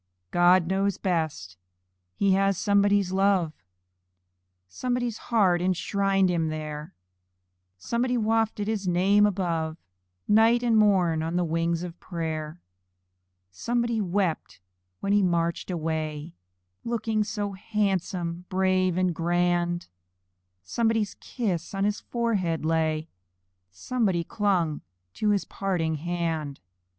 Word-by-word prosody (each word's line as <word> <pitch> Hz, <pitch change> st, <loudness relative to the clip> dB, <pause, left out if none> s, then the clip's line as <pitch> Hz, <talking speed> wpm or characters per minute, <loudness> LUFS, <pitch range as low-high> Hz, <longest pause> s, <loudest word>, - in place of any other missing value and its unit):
God 175 Hz, 0 st, +5 dB
knows 195 Hz, +2 st, 0 dB
best! 155 Hz, -, -2 dB, 0.6 s
He 200 Hz, -, +2 dB
has 195 Hz, 0 st, +2 dB
somebody's 200 Hz, -1 st, +2 dB
love; 190 Hz, -4 st, +2 dB, 1.1 s
Somebody's 245 Hz, -, -2 dB
heart 190 Hz, -7 st, +3 dB
enshrined 195 Hz, +1 st, +1 dB
him 170 Hz, -3 st, 0 dB
there 155 Hz, -1 st, -5 dB, 0.8 s
Somebody 240 Hz, -, -1 dB
wafted 220 Hz, -2 st, 0 dB
his 210 Hz, -3 st, -2 dB
name 195 Hz, +4 st, +4 dB
above, 165 Hz, -5 st, -2 dB, 0.5 s
Night 225 Hz, +3 st, +4 dB
and 235 Hz, -2 st, +3 dB
morn, 185 Hz, -7 st, +3 dB
on 165 Hz, +2 st, -2 dB
the 180 Hz, -, +2 dB
wings 165 Hz, +1 st, 0 dB
of 175 Hz, -1 st, -7 dB
prayer. 160 Hz, -2 st, -4 dB, 0.9 s
Somebody 235 Hz, -, -1 dB
wept 185 Hz, -3 st, -1 dB, 0.4 s
when 200 Hz, 0 st, 0 dB
he 205 Hz, -, +4 dB
marched 170 Hz, -2 st, 0 dB
away, 160 Hz, -2 st, -3 dB, 0.5 s
Looking 225 Hz, -2 st, 0 dB
so 205 Hz, -1 st, -3 dB
handsome, 190 Hz, -4 st, -2 dB
brave, 185 Hz, -1 st, +1 dB
and 185 Hz, -1 st, +1 dB
grand! 175 Hz, +1 st, 0 dB, 0.8 s
Somebody's 225 Hz, -, 0 dB
kiss 195 Hz, -7 st, -3 dB
on 195 Hz, -, 0 dB
his 205 Hz, +1 st, 0 dB
forehead 200 Hz, -10 st, -1 dB
lay 160 Hz, -1 st, 0 dB, 0.6 s
Somebody 185 Hz, -, -1 dB
clung 175 Hz, -6 st, 0 dB, 0.3 s
to 215 Hz, -, 0 dB
his 205 Hz, -2 st, +1 dB
parting 175 Hz, -5 st, -1 dB
hand. 165 Hz, -3 st, -3 dB
185 Hz, 110 wpm, -26 LUFS, 165-205 Hz, 1.1 s, God